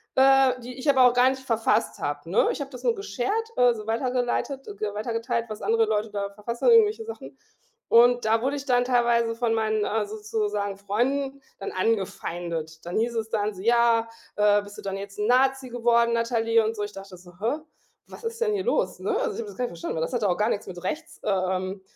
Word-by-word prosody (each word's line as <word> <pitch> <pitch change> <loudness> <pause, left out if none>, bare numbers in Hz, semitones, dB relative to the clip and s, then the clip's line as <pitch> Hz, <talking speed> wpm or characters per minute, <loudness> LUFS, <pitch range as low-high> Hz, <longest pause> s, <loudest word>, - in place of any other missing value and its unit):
äh, 270 -1 +5
die 250 +1 -9
ich 285 - -1
aber 265 -2 +6
auch - - -2
gar 250 +1 +5
nicht 265 0 -4
verfasst 225 -3 0
habe, 145 +2 -4
ne? 190 - +3
Ich - - -5
habe 280 0 -6
das 250 - -10
nur 470 - +3
geshared, 415 - -2
also, 235 -4 +3
weitergeleitet, 250 +3 -1
g 210 -1 -3
weiter 215 +3 -4
geteilt, 230 0 -1
was 215 - -7
andere 225 0 +2
Leute 215 0 -1
da 200 -1 -3
verfasst 225 +4 -6
haben, 485 - +5
irgendwelche 445 -1 +5
Sachen. 455 - -9 0.5
Und 240 +1 +5
da 225 +1 +2
wurde 270 +3 0
ich 280 - -7
dann 245 -2 +3
teilweise 235 -2 +2
von 230 -1 0
meinen, 215 -1 0
äh, 215 -1 0
sozusagen 210 -1 -3
Freunden 265 +7 -1 0.2
dann 195 - -5
angefeindet. 175 -5 -2
Dann 175 - -3
hieß 235 +1 0
es 225 -1 -2
dann 210 -1 -1
so: 185 - -9
„Ja, 230 0 +3 0.3
äh, 205 0 +4
bist 205 0 -12
du - - -8
dann 195 0 -3
jetzt 200 +1 -8
'n 210 - 0
Nazi 265 +1 +2
geworden, 235 -1 +2
Natalie?“ 230 -1 +2
und 225 - -2
so. 210 - -5
Ich 205 0 -6
dachte 195 -1 -10
so: 175 0 -16
„Hä? 235 +8 0 0.5
Was - - -12
ist 460 0 -5
denn 440 -2 +2
hier 395 -2 -1
los“, - - 0
ne? 435 - -1
Also - - -1
ich 425 - -7
habe 460 - -4
das - - -12
gar 250 - 0
nicht - - -4
verstanden, 170 - -5
weil - - -1
das 165 - -4
hatte 220 -5 +1
auch 180 - +1
gar 210 +2 +1
nix 205 - -2
mit 175 -2 -8
rechts, 315 - -5
äh, - - -1
ähm, 185 0 -1
230 Hz, 230 wpm, -25 LUFS, 205-255 Hz, 0.5 s, aber